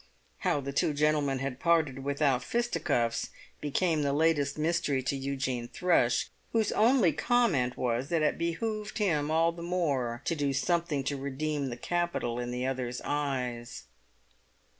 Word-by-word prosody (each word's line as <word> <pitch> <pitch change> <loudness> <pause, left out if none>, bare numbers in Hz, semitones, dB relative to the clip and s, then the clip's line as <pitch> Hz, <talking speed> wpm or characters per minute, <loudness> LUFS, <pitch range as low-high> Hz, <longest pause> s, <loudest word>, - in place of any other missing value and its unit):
How 145 - +1
the 140 0 -5
two 145 +1 +1
gentlemen 145 -2 +2
had 135 -1 -4
parted 160 -6 +2
without 140 -2 +1
fisticuffs 165 - 0 0.3
became 155 +2 +1
the 140 -1 +1
latest 155 -1 +2
mystery 155 -4 0
to 135 +2 -1
Eugene 135 -3 -2
Thrush, 125 -7 +2 0.2
whose 225 -2 +2
only 225 - +4
comment 190 - +2
was 125 +2 -1
that 165 -2 +1
it 150 - +1
behoved 210 +6 -2
him 160 -9 +1
all 165 +1 +3
the 170 0 -10
more 140 -10 -1
to - - +1
do 145 -2 0
something 170 -1 0
to 140 +1 -2
redeem 140 +1 -2
the 120 -2 -5
capital 175 -8 -1
in 120 0 -3
the 125 +1 -2
other's 125 -2 -2
eyes. 125 - -3
145 Hz, 150 wpm, -30 LUFS, 130-170 Hz, 0.3 s, only